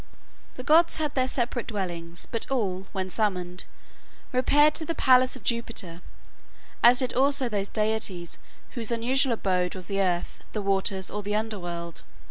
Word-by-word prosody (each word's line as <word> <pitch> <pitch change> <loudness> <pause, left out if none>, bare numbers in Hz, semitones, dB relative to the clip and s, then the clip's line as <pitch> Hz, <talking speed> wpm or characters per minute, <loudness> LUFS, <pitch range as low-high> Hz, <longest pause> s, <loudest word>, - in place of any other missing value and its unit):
The 255 - -7
gods 325 +5 +5
had 305 -2 -2
their 260 -1 +1
separate 240 -2 -2
dwellings; 175 -5 -4
but 230 - -2
all, 195 -8 -1
when 190 -1 -3
summoned, 180 -4 -1 0.7
repaired 290 +4 +4
to 320 - -1
the 330 +1 -3
palace 255 0 +4
of 260 - -11
Jupiter, 225 -7 -3 0.8
as 245 +1 +7
did 255 -2 +1
also 275 0 +3
those 200 -3 -2
deities 210 -5 -2 0.3
whose 230 -4 -3
usual 245 +2 +2
abode 185 -4 0
was 185 -1 -5
the 195 0 -1
earth, 175 -2 -1
the 215 - -2
waters, 195 -1 0
or 210 - -3
the 205 +1 -2
underworld. 175 -6 -4
215 Hz, 155 wpm, -26 LUFS, 185-255 Hz, 0.8 s, as